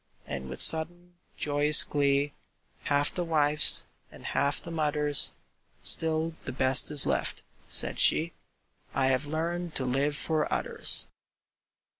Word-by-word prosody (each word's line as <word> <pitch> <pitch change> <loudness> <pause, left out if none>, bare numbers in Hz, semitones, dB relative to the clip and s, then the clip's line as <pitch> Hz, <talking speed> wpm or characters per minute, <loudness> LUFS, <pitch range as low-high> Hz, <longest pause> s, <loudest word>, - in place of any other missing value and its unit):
And 65 -2 -7
with 65 - -2
sudden, 175 +2 +4 0.2
joyous 145 +1 +5
glee, 140 0 -1 0.5
Half 145 0 -1
the 180 - -3
wife's 150 -2 +1 0.3
and - - -15
half 140 0 -1
the 170 - -11
mother's, 150 -2 0 0.5
"Still 160 0 0
the - - -5
best 130 0 +2
is 150 -2 +5
left," - - -3 0.2
said - - +3
she: 165 +2 +2 0.6
"I 135 0 +1
have 130 +2 -1
learned 170 +2 -4
to 130 - -2
live 140 +4 -1
for 155 -1 -3
others." - - +1
150 Hz, 130 wpm, -27 LUFS, 140-160 Hz, 0.6 s, joyous